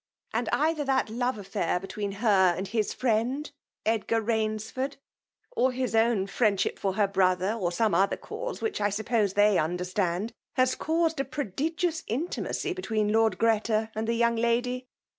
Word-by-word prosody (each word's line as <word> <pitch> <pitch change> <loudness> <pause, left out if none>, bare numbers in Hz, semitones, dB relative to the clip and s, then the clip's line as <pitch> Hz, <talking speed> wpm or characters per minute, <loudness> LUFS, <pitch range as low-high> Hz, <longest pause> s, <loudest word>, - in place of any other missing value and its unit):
And - - 0
either 310 0 +1
that 265 -5 +1
love 245 +1 -1
affair 185 -3 -1
between 200 +1 -4
her 195 -4 +3
and 190 +2 -3
his 215 -1 0
friend 255 +5 0 0.3
Edgar 225 +1 +1
Rains 220 -1 -1
ford, 265 +2 -3 0.5
or 265 - +2
his 255 -1 -2
own 225 -3 +3
friendship 200 -1 +1
for 195 -1 0
her 205 +1 +2
brother, 185 0 +2
or 190 -7 -1
some 215 +4 +1
other 195 +1 +2
cause, - - -6
which 440 - -1
I 205 - +3
suppose 210 -1 0
they 205 -1 +4
under 175 +3 -1
stand^ 185 +3 -1 0.2
has 255 0 +3
caused 325 -1 0
a - - +2
prodigious 315 - -2
intimacy 330 - -2
be 370 - -6
tween 215 - 0
Lord 225 0 +3
Ghreta 220 0 +1
and 220 +1 -3
the 230 - +1
young 235 0 +2
lady." 245 +2 0
225 Hz, 170 wpm, -28 LUFS, 205-255 Hz, 0.5 s, they